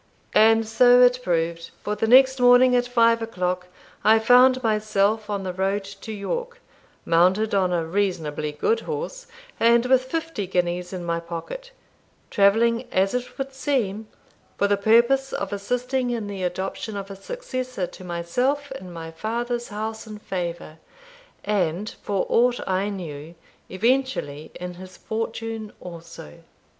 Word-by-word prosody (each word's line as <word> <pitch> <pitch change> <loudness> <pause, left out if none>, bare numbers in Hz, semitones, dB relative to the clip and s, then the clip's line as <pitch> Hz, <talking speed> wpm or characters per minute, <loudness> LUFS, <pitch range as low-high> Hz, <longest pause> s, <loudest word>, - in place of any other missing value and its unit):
And 225 +1 +5
so 245 +2 +6
it 250 0 +4
proved; 165 -4 -1
for 210 - -2
the 225 - -1
next 260 +2 +6
morning, 250 +1 +6
at 245 0 +2
five 230 -1 +3
o'clock, 180 -5 -2 0.4
I 220 +1 +6
found 250 +3 +5
myself 215 -1 +1
on 200 -2 -2
the 185 -1 -4
road 195 +2 -1
to 200 +2 -9
York, 475 - -4 0.5
mounted 185 +6 +3
on 190 -2 +2
a 170 -2 0
reasonably 160 -5 -2
good 445 - 0
horse, - - -5 0.3
and 235 +1 +4
with 260 0 +4
fifty 320 - -3
guineas 180 -1 -1
in 180 -2 -5
my 170 0 -1
pocket; 170 - -7 0.6
travelling, 230 +4 +3
as 195 +1 +1
it 250 0 -4
would 270 -1 -4
seem, 225 -7 -1 0.5
for 200 - +2
the 205 - +3
purpose 235 +6 +3
of 200 0 -3
assisting 250 +5 -1
in 235 -3 -2
the 200 -2 -6
adoption 190 +4 -3
of 195 0 -6
a - - -7
successor 255 - -4
to 185 - -12
myself 245 +12 -1
in 185 -8 -8
my 165 -1 -8
father's 235 +7 -3
house 220 +2 -5
and 215 -1 -8
favour, 170 -4 -5 0.7
and, 195 -1 -1
for 200 -2 -1
aught 245 +1 +3
I 190 +2 0
knew, 165 -4 -7 0.3
eventually 215 - -1
in 180 0 -6
his 185 +1 -12
fortune 225 -1 -4
also. 165 - -11
210 Hz, 150 wpm, -24 LUFS, 180-245 Hz, 0.7 s, so